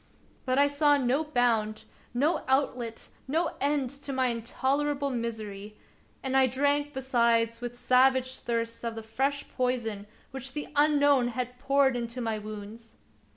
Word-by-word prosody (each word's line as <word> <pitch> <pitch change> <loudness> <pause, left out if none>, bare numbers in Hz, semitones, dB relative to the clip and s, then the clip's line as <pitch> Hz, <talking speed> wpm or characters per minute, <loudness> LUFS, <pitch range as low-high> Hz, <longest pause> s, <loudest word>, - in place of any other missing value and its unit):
But 255 0 +1
I 285 +1 +5
saw 290 0 +3
no 270 +3 +1
bound, 235 -7 0 0.3
no 285 +7 +1
outlet, 255 -4 -1 0.2
no 325 +5 0
end 280 -3 +1
to 280 0 -7
my 260 -1 +1
intolerable 275 +5 -1
misery; 215 -4 -5 0.5
and 265 0 -1
I 265 -1 +5
drank 285 +3 +1
besides 235 -3 +1
with 245 0 -5
savage 260 +1 +3
thirst 230 -1 -3
of 230 -1 -3
the 225 - -6
fresh 270 +6 -1
poison 235 -5 -2 0.2
which 265 0 -6
the 295 - -5
Unknown 285 -3 +4
had 250 +1 -4
poured 275 0 +3
into 235 +1 -4
my 225 -3 -2
wounds. 215 +2 -9
255 Hz, 145 wpm, -28 LUFS, 230-280 Hz, 0.5 s, I